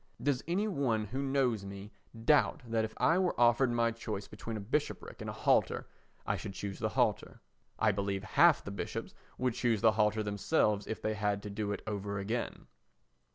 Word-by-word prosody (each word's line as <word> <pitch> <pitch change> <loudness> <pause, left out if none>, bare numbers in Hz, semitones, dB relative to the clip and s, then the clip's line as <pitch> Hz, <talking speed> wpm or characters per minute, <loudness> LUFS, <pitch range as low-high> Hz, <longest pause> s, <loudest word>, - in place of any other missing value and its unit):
Does 140 -3 0
any 190 +5 +1
one 130 - 0
who 130 +6 -3
knows 135 -6 +1
me 100 +1 -8 0.3
doubt 150 +1 +4
that 115 -1 0
if 110 - -5
I 170 +3 +3
were 180 -7 0
offered 120 +2 +5
my 115 -1 +2
choice 110 -3 -5
between 110 +1 -6
a - - -4
bishopric 130 +9 -3
and - - -4
a - - -4
halter, - - +2 0.4
I - - 0
should 100 - -6
choose 100 0 -5
the - - 0
halter? - - 0 0.4
I 110 - +3
believe 100 0 -2
half 170 +8 +5
the 100 - -6
bishops 100 - -5 0.2
would 125 -1 0
choose 115 -3 +1
the 115 -1 +6
halter 110 0 +2
themselves 105 0 +1
if 110 - -5
they 110 - 0
had 100 -1 -1
to 105 - -6
do 105 0 -2
it 100 - -4
over 100 -1 -3
again. 110 +5 -3
110 Hz, 195 wpm, -32 LUFS, 100-125 Hz, 0.4 s, the